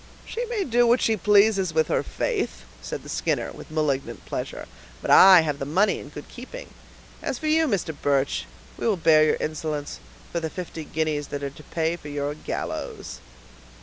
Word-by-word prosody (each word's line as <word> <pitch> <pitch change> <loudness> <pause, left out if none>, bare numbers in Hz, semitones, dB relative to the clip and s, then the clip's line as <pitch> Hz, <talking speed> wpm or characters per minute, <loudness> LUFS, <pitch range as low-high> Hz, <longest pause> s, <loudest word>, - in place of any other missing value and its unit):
"She 475 - -4
may 450 -4 -1
do 240 -4 +3
what 240 +2 +5
she 225 - +2
pleases 200 -3 +3
with 160 -1 +3
her - - +1
faith," - - -2 0.2
said 65 - -6
the - - -12
Skinner, - - -1
with - - -11
malignant 140 -7 -2
pleasure, - - -5 0.3
"but - - -2
I 190 -2 +9
have 150 -3 -2
the - - -3
money 190 +7 +2
in - - -10
good 150 0 -9
keeping; - - -9 0.5
as 260 - -2
for 315 - -7
you, 315 +1 +3
Mr. 185 - -1
Birch, 140 -1 +1 0.3
we - - -1
will 210 -4 +2
bear 160 -2 +5
your 155 - +3
insolence, 155 -1 -3 0.3
for 170 - -1
the 160 -1 -3
fifty 165 -2 -6
guineas 155 -2 -1
that 145 0 -5
are 140 - -3
to 150 - -14
pay 165 +1 -1
for 150 - -10
your 145 0 -2
gallows." 155 - -5
160 Hz, 190 wpm, -25 LUFS, 145-210 Hz, 0.5 s, I